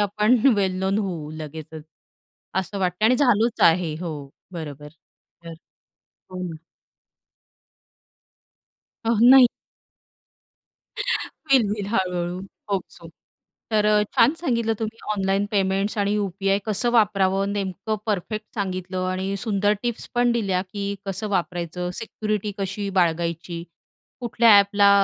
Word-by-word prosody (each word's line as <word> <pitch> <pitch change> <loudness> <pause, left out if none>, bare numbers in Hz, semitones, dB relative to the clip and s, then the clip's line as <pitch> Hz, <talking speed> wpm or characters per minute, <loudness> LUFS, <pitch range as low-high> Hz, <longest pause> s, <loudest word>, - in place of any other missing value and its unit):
आपण 210 +4 +3 0.2
वेल 190 -2 +1
नोन 190 +2 0
होऊ 170 -7 -3
लगेचच, 155 0 -8 0.7
असं 190 +2 -2
वाटतंय. 185 +3 +1
आणि 250 - +4
झालोच 240 -4 +2
आहे. 165 -2 -1
हो, 170 -3 -4 0.4
बरोबर. 150 -4 -7 0.6
तर 165 -1 -8 0.8
हो. 185 - -6 2.7
अहो 230 - +3
नाही. 265 -1 +9 2.0
होईल, 270 -6 +4
होईल, 205 -1 -3
हळू-हळू 180 -2 -1 0.3
होप 195 -2 +1
सो. 170 -1 -13 0.6
तर 210 -1 +2
अ, 210 0 +4
छान 235 +5 +6
सांगितलं 235 -8 0
तुम्ही 225 0 -4
ऑनलाईन 195 0 0
पेमेंट्स 195 0 0
आणि 200 0 +1
यू-पी-आय 195 -1 0
कसं 220 +3 +1
वापरावं, 195 -3 +2
नेमकं 200 +2 -3
परफेक्ट 215 +2 -2
सांगितलं 185 -2 -3
आणि 190 +1 -2
सुंदर 205 -1 +1
टिप्स 240 -2 -3
पण 245 0 +3
दिल्या 195 -6 0
की 200 +1 -4
कसं 195 +3 -3
वापरायचं, 180 -2 -2
सिक्युरिटी 215 -1 -3
कशी 200 +1 -3
बाळगायची? 170 0 0 0.6
कुठल्या 235 -1 +3
अ‍ॅपला 200 0 +4
195 Hz, 115 wpm, -23 LUFS, 180-215 Hz, 2.7 s, नाही